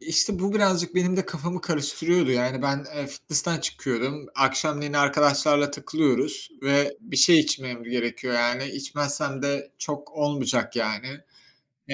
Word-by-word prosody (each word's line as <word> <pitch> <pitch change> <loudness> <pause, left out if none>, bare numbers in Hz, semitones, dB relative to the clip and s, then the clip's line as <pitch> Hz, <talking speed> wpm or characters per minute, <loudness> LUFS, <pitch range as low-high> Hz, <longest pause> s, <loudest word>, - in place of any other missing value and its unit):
İşte, 180 +4 +1
bu 200 +3 -1
birazcık 185 -4 +2
benim 185 0 +2
de 190 - 0
kafamı 175 +3 -4
karıştırıyordu. 160 0 +1
Yani 125 +1 0
ben, 140 0 -1
eee, 145 -1 -4
fitnessten 155 +3 -1
çıkıyorum. 130 +2 -3
Akşamleyin 145 +2 +1
arkadaşlarla 145 0 +3
takılıyoruz 150 - -1
ve 140 +1 +2
bir 225 - -8
şey 170 -3 +8
içmem 125 -5 -2
gerekiyor. 120 +1 -2
Yani 120 +2 +1
içmezsem 140 0 -3
de 140 0 -2
çok 145 -1 -6
olmayacak 145 -6 -1
yani. 110 +2 -2 0.8
E - - -2
145 Hz, 135 wpm, -25 LUFS, 135-160 Hz, 0.8 s, şey